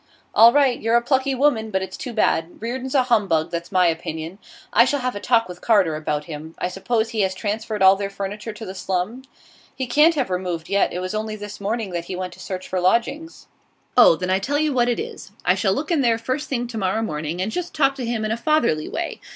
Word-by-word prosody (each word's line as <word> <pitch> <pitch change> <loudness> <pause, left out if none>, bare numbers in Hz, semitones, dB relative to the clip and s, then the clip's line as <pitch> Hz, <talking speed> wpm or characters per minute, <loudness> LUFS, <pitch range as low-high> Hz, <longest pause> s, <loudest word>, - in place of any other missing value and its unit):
'All 230 +1 +8
right; 270 -3 +3
you're 225 +1 +2
a 235 - +5
plucky 265 +1 +1
woman, 245 -5 +2
but 190 -2 -1
it's 190 0 -7
too 250 - -6
bad. 175 -6 0
Reardon's 255 +4 -4
a 260 - +5
humbug, 200 -10 +1
that's 170 +2 -4
my 185 -2 +4
opinion. 160 +2 -3 0.3
I - - +7
shall 285 -2 0
have 250 -2 -2
a - - -4
talk 230 +2 +2
with 180 0 -10
Carter 195 -9 +3
about 150 -1 -2
him. 160 0 -8
I 180 - -2
suppose 220 +5 -1
he 225 -2 -1
has 190 -1 0
transferred 210 0 -2
all 190 +1 +8
their 200 0 -3
furniture 200 +3 -5
to 220 +1 -9
the 190 - -6
slum?' 195 +7 -3 0.5
'He 260 - -2
can't 300 +7 +4
have 265 -9 -1
removed 180 -3 -3
yet. 200 0 +2
It 180 - -4
was 185 +2 -4
only 215 0 -3
this 205 -1 -8
morning 215 0 -2
that 170 -1 -3
he 185 - -5
went 185 0 -5
to - - -16
search 185 -1 -6
for 185 -1 -2
lodgings.' 240 - 0 0.5
'Oh, 245 -9 +7
then 180 +3 -3
I 190 - +3
tell 280 +9 -1
you 305 -1 +1
what 245 -1 +2
it 240 - 0
is: 200 - -7
I 180 - +5
shall 195 +1 +1
look 300 - -3
in 320 -4 +3
there 235 -3 +3
the 230 - -16
first 275 +5 -2
thing 245 -3 -1
to 225 -2 -4
morrow 195 +3 0
morning, 155 -2 -3
and 195 +4 -1
just 355 +7 -4
talk 275 -2 +3
to 260 - -4
him 230 -2 -1
in 215 - -2
a 225 - 0
fatherly 235 - +1
way. - - -4
215 Hz, 250 wpm, -22 LUFS, 185-245 Hz, 0.5 s, All